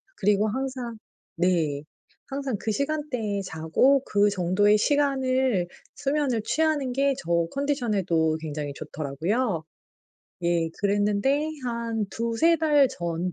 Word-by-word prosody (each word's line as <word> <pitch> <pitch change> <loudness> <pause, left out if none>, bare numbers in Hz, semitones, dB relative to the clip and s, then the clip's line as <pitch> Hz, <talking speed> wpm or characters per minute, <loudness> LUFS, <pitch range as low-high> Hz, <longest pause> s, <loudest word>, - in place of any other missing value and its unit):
그리고 210 +1 +2
항상 250 -1 -3 0.4
네. 165 -5 +1 0.5
항상 275 -3 -3
그 220 - -2
시간대에 265 -7 -2
자고 185 - +2
그 205 0 +3
정도의 200 +3 +3
시간을 260 -7 +1 0.3
수면을 275 -5 0
취하는 300 -4 0
게 275 +1 +2
저 170 -6 0
컨디션에도 205 - 0
굉장히 150 -2 -4
좋더라고요. 160 - -2 0.8
예. 170 -1 +1
그랬는데 205 +9 +1 0.2
한 230 -2 -2
2-3 235 +9 +2
달 295 -3 +4
전 170 -1 -3
215 Hz, 230 characters per minute, -26 LUFS, 175-270 Hz, 0.8 s, 달